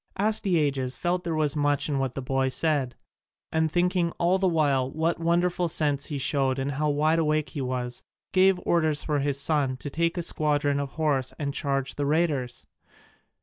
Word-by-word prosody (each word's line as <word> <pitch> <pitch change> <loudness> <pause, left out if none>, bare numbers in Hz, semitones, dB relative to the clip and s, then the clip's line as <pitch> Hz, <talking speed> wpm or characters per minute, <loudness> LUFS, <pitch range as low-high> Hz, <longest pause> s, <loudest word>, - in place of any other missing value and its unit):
Astyages 155 -11 0
felt 175 0 -1
there 165 -2 -2
was 150 -2 +1
much 145 -1 +1
in 140 -3 -1
what 135 -2 -2
the 135 - -4
boy 135 +1 0
said, 135 -3 -1 0.6
and 160 0 +1
thinking 175 0 +1
all 180 +3 +2
the 190 - +2
while 145 -6 +1
what 160 +4 -1
wonderful 175 +1 +1
sense 145 -3 0
he 145 - -3
showed 135 -1 +1
and 135 +1 -2
how 150 +2 -1
wide 155 +3 +2
awake 155 -2 0
he 145 - -5
was, 125 -1 -3 0.3
gave 185 0 +4
orders 155 -3 +2
for 150 -2 0
his 140 0 0
son 140 -3 +1
to 140 +3 -7
take 170 +3 0
a 175 - -1
squadron 145 -3 +1
of 140 -1 -4
horse 145 -5 -1
and 140 -2 -3
charge 135 -2 -2
the 145 -1 -1
raiders. 145 -6 0
150 Hz, 185 wpm, -26 LUFS, 135-165 Hz, 0.6 s, gave